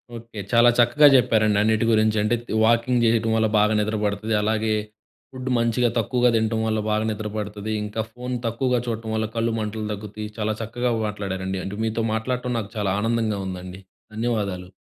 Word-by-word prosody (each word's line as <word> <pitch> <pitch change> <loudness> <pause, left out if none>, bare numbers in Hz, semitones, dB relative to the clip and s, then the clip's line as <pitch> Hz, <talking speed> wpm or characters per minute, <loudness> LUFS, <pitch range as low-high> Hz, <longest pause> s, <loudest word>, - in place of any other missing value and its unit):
Okay. 115 -2 -9
చాలా 120 +1 +6
చక్కగా 120 +5 +6
చెప్పారండి 110 -4 +3
అన్నిటి 110 +1 +2
గురించి. 110 0 +3
అంటే, 120 +3 +2
త్ - - -7
వాకింగ్ 120 +2 +3
చెయటం 115 0 +2
వల్ల 110 0 +3
బాగా 105 +1 +3
నిద్రపడతది. 105 0 -1
అలాగే, 110 +1 0 0.6
ఫుడ్డ్ 130 0 -5
మంచిగా, 115 +1 +2
తక్కువగా 125 +2 +2
తినటం 110 0 +1
వల్ల 110 0 0
బాగా 110 +1 +1
నిద్రపడతది, 105 0 -5
ఇంకా 105 +2 -3
ఫోన్ 125 +1 -5
తక్కువగా 125 +2 0
చూడటం 110 -1 -3
వల్ల 110 0 0
కళ్ళు 115 0 0
మంటలు 105 0 -3
తగ్గుతుయి, 105 +1 -7
చాలా 110 0 0
చక్కగా 120 +2 -2 0.2
మాట్లాడారండి. 95 -2 -4
అంటే, 100 +1 -5
మీతో 110 +1 -1
మాట్లాడటం 125 +2 -2
నాకు 105 0 -7
చాలా 100 -3 0
ఆనందంగా 115 -2 0
ఉందండి. 90 +1 -7 0.3
ధన్యవాదాలు. 105 -6 -2
110 Hz, 160 wpm, -23 LUFS, 105-115 Hz, 0.6 s, చాలా